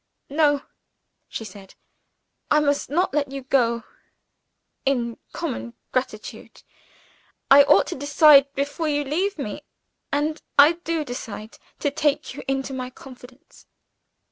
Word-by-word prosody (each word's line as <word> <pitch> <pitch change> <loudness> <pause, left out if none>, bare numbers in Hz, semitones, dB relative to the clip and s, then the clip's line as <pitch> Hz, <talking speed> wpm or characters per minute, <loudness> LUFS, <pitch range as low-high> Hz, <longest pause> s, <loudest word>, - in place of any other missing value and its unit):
"No," 290 -1 +2 0.7
she 225 - -6
said; 195 -1 -13 0.7
"I 300 - +5
must 285 -1 0
not 340 +2 0
let 285 -2 0
you 275 -1 -6
go. 235 -3 +1 1.0
In 240 -4 -1
common 115 +1 -5 0.2
gratitude 250 -4 -5 0.9
I 280 +1 +10
ought 195 -7 +5
to - - -5
decide 285 0 +6
before 285 +3 -2
you 290 -1 0
leave 350 +8 -1
me, 275 0 -5 0.5
and 300 +2 -1 0.2
I 290 +2 +8
do 335 -2 -3
decide 225 -4 -8 0.2
to 285 - +1
take 295 0 0
you 280 - -8
into 270 0 -2
my 255 -1 -4
confidence." 255 +3 -15
280 Hz, 125 wpm, -23 LUFS, 250-295 Hz, 1.0 s, I